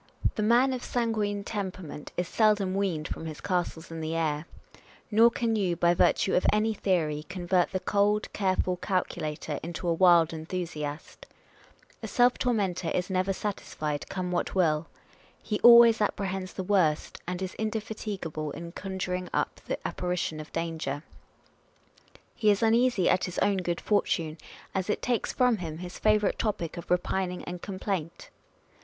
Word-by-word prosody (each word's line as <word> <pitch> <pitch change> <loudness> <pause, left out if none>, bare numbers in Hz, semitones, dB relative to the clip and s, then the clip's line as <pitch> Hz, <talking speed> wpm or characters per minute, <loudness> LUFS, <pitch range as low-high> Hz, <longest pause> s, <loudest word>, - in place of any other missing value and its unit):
The - - -2
man 240 +5 +4
of 250 - -4
sanguine 215 -4 -1
temperament 185 -8 -5
is 180 - 0
seldom 210 -2 +2
weaned 185 -6 -1
from 160 - -5
his 155 -2 -7
castles 175 -3 -2
in 165 0 -5
the 160 +1 -2
air; 155 -1 -1 0.6
nor 225 +2 +7
can 230 -1 -1
you, 190 -5 +1
by 170 +1 +3
virtue 190 +2 +3
of 180 - +3
any 215 +1 +2
theory, 160 -7 0
convert 180 0 +1
the 185 - -1
cold, 205 +2 +1
careful 185 -2 0
calculator 165 -5 -2
into 170 +2 -5
a 170 - +3
wild 170 -2 +5
enthusiast. 160 - -5 0.7
A - - -5
self 245 0 +3
tormentor 195 -8 0
is 180 +3 -1
never 185 +1 +1
satisfied, 155 -7 -4
come 180 -1 -3
what 175 - -1
will. 160 -3 +2 0.5
He 210 - -3
always 235 -2 +8
apprehends 190 -2 -2
the 190 - -4
worst, 180 -6 +1
and 180 0 -3
is 185 -1 -4
indefatigable 210 -8 -3
in 170 0 -7
conjuring 185 -1 -4
up - - -1
the - - -1
apparition 180 -3 -2
of 155 - -9
danger. 160 -4 -3 1.3
He 215 - +2
is 205 +1 +3
imeasy 230 -3 +3
at 185 +1 +3
his 180 - -6
own 200 -1 +2
good 175 -2 -2
fortune, 165 -6 0 0.3
as 190 +1 -2
it - - -1
takes 245 -3 0
from 250 -3 +3
him 160 -4 -5
his 180 +1 -8
favourite 215 -1 +2
topic 185 -7 -2
of 170 - -8
repining 180 0 0
and 175 0 -6
complaint. 185 -4 -4
185 Hz, 155 wpm, -28 LUFS, 170-210 Hz, 1.3 s, always